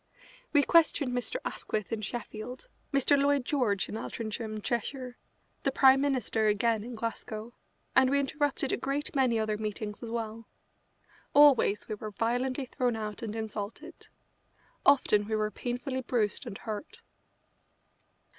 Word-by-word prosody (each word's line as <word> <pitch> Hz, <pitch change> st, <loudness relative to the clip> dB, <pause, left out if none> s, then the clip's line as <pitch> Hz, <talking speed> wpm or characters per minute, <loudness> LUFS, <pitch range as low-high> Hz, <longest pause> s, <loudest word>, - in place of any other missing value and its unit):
We 290 Hz, -1 st, +5 dB
questioned 315 Hz, -5 st, +4 dB
Mr. 245 Hz, -, -2 dB
Asquith 215 Hz, -1 st, -3 dB
in 220 Hz, -, -2 dB
Sheffield, 240 Hz, -, -6 dB, 0.2 s
Mr. 275 Hz, 0 st, +4 dB
Lloyd 280 Hz, -2 st, +2 dB
George 240 Hz, -10 st, +1 dB
in -, -, -8 dB
Altrincham, 220 Hz, 0 st, -4 dB
Cheshire, 245 Hz, +3 st, -3 dB, 0.5 s
the 275 Hz, -, +1 dB
Prime 265 Hz, 0 st, +6 dB
Minister 250 Hz, -6 st, +1 dB
again 215 Hz, +1 st, +2 dB
in 240 Hz, +1 st, -7 dB
Glasgow, 225 Hz, 0 st, -5 dB, 0.4 s
and 265 Hz, -1 st, +6 dB
we 280 Hz, +1 st, +3 dB
interrupted 280 Hz, -1 st, 0 dB
a -, -, +1 dB
great 280 Hz, +2 st, -2 dB
many 255 Hz, -4 st, +3 dB
other 215 Hz, -1 st, -1 dB
meetings 210 Hz, -1 st, -4 dB
as 235 Hz, -, -6 dB
well. 225 Hz, -1 st, -4 dB, 0.9 s
Always 280 Hz, -8 st, +6 dB
we 215 Hz, -, -3 dB
were 215 Hz, +1 st, -5 dB
violently 245 Hz, +5 st, -1 dB
thrown 245 Hz, -1 st, -1 dB
out 215 Hz, -1 st, -5 dB
and 220 Hz, -2 st, -4 dB
insulted. 220 Hz, +7 st, -6 dB, 0.8 s
Often 210 Hz, -7 st, +5 dB
we 220 Hz, -, 0 dB
were 215 Hz, 0 st, 0 dB
painfully 250 Hz, +4 st, -3 dB
bruised 230 Hz, -5 st, -1 dB
and 195 Hz, -, -6 dB
hurt. 290 Hz, -, -7 dB
235 Hz, 140 wpm, -30 LUFS, 215-270 Hz, 0.9 s, Prime